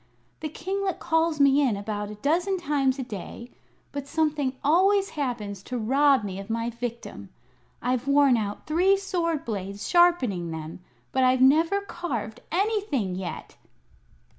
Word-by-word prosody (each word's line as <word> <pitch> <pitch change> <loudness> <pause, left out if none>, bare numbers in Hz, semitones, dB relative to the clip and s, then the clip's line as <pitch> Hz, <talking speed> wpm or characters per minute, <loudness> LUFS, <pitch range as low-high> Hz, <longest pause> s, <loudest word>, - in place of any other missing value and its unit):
The 310 - -4
kinglet 380 +4 -3
calls 325 -1 +1
me 280 0 +5
in 245 -8 +1
about 205 0 -4
a 210 - -7
dozen 345 - 0
times 280 -6 0
a 265 - -3
day, 235 +2 -8 0.4
but 285 -1 -5
something 295 -4 0
always 385 +6 +3
happens 235 -9 -4
to 250 +5 -5
rob 270 +2 +3
me 195 -1 -5
of 195 - -9
my 230 +1 -1
victim. 235 - -6 0.5
I've 250 +1 -1
worn 280 -2 +5
out 205 -3 -3
three 365 +6 +3
sword 345 -6 -2
blades, 200 -2 -4
sharpening 265 - +3
them, 160 +1 -6 0.3
but 260 - +2
I've 255 0 +3
never 325 +9 +4
carved 245 - -5
anything 375 - 0
yet!" 180 -1 -6
270 Hz, 145 wpm, -26 LUFS, 215-330 Hz, 0.5 s, me